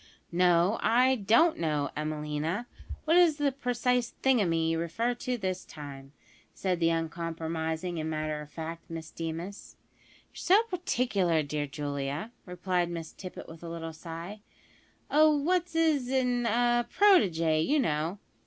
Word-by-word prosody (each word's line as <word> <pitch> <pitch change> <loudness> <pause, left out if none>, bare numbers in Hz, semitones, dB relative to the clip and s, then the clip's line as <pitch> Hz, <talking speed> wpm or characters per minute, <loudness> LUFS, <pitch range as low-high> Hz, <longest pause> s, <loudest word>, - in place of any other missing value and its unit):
"No, 180 +3 +3
I 250 +3 +4
don't 235 - +3
know, 150 -4 0
Emelina, 150 +6 -2 0.4
what 320 +2 +3
is 340 -4 +5
the 290 -2 +1
precise 250 -2 0
`thingumy' 175 -11 +3
you 165 0 0
refer 220 +9 -1
to 245 +1 -3
this 185 -3 -3
time," 140 -3 -10 0.4
said 185 -3 -1
the 165 -1 +3
uncompromising 165 0 -3
and 155 0 -2
matter 155 -1 -2
of 150 - -10
fact 165 +2 -7
Miss 160 -1 -7
Deemas. 165 +4 -6 0.6
"You're - - -16
so 395 +5 +4
particular, 240 - 0
dear 145 0 -3
Julia," 145 +6 -4 0.2
replied 180 -1 -1
Miss 165 -2 -6
Tippet 185 -2 -9
with 165 0 -11
a 170 - -7
little 165 -1 -6
sigh; 170 +5 -8 0.7
"a 310 +1 +6
what's 335 +4 +1
'is 310 -6 +2
n, 250 -2 +1
a 240 +1 +2
protege, 170 - +4
you 290 - +2
know." 160 - 0
175 Hz, 145 wpm, -29 LUFS, 160-245 Hz, 0.7 s, a